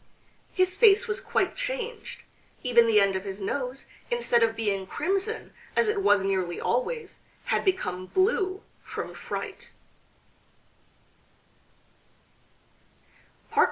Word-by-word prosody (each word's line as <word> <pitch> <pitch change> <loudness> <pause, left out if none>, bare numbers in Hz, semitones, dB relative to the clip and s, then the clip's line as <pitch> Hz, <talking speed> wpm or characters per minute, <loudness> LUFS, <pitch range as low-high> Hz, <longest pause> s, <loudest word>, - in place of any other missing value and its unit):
His 370 -1 +1
face 440 +1 +6
was 425 - -1
quite - - 0
changed; - - -5 0.4
even 235 -2 +5
the 215 -2 +5
end 195 -1 +3
of 190 - -2
his 195 0 -5
nose, 255 +6 -3 0.2
instead 475 - +2
of 225 -1 +3
being 200 -4 -1
crimson, 390 - -2 0.2
as 460 - +3
it 425 -1 +1
was 205 - +4
nearly 185 -3 -1
always, 350 - -2 0.3
had - - +1
become 185 - -1
blue 380 - +1 0.2
from - - -6
fright. - - -6
275 Hz, 110 wpm, -27 LUFS, -, 0.4 s, face